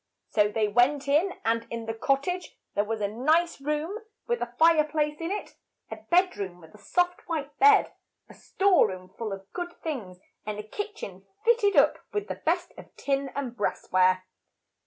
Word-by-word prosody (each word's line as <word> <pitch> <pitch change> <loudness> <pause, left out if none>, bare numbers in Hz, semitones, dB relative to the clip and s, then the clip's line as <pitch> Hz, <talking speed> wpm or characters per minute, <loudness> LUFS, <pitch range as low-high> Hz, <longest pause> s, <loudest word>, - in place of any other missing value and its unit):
So 210 -1 +4
they 210 0 0
went 250 +6 +2
in, 320 +7 +3
and 230 +1 +1
in 230 -1 -5
the 225 - -3
cot 275 +4 +1
tage 360 +2 -4 0.2
there 205 - +2
was 220 0 -3
a 205 - +1
nice 305 +10 +1
room 300 +8 -2 0.3
with 475 0 -1
a - - -3
fire 325 -1 +6
place 300 0 -2
in 330 - -2
it, 410 +2 -5 0.3
a - - -5
bed 365 +1 +2
room 185 -3 -5
with 160 -2 -16
a 210 - -15
soft 355 - -1
white 295 -3 -3
bed, 420 +1 +6 0.3
a - - -14
store 385 - +3
room 185 -2 -8
full 225 -3 -4
of 195 0 -8
good 350 -1 -4
things, 230 - -4 0.3
and 210 -1 -4
a 210 - -5
kitch 415 - -6
en 190 0 -8 0.2
fit 470 0 +5
ted 405 -2 +2
up - - +5
with 415 0 -2
the - - -5
best - - 0
of - - -10
tin 275 -1 -1
and 265 -4 -3
brass 210 - -3
ware. 185 0 +4
280 Hz, 200 wpm, -27 LUFS, 210-350 Hz, 0.3 s, fire